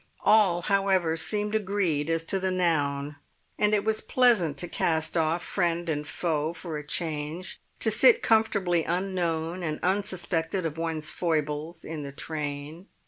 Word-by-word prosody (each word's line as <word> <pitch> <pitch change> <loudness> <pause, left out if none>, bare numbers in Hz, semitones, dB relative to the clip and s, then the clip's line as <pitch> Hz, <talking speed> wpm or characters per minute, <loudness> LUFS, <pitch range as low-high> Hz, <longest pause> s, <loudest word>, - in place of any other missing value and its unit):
All, 190 -6 +5
however, 190 -4 +2
seemed 210 +5 -2
agreed 190 -8 0
as 165 0 0
to 195 +4 -1
the 190 0 0
noun; 145 -5 0 0.4
and 210 0 +3
it 205 - 0
was 220 0 0
pleasant 220 - +3
to 175 - -3
cast 160 -1 0
off 165 +1 +1
friend 175 -2 -1
and 150 -1 -2
foe 160 -1 -1
for 165 -3 -5
a - - -8
change, 155 +2 -4 0.2
to - - +3
sit 475 -1 +5
comfortably 200 -7 +2
unknown 175 -1 -1
and 155 -3 -3
unsuspected 185 -2 -1
of 160 0 -3
one's 160 -2 -2
foibles 155 0 -2
in 160 -1 -5
the 140 -1 -6
train. 150 +4 -5
170 Hz, 150 wpm, -27 LUFS, 155-190 Hz, 0.4 s, All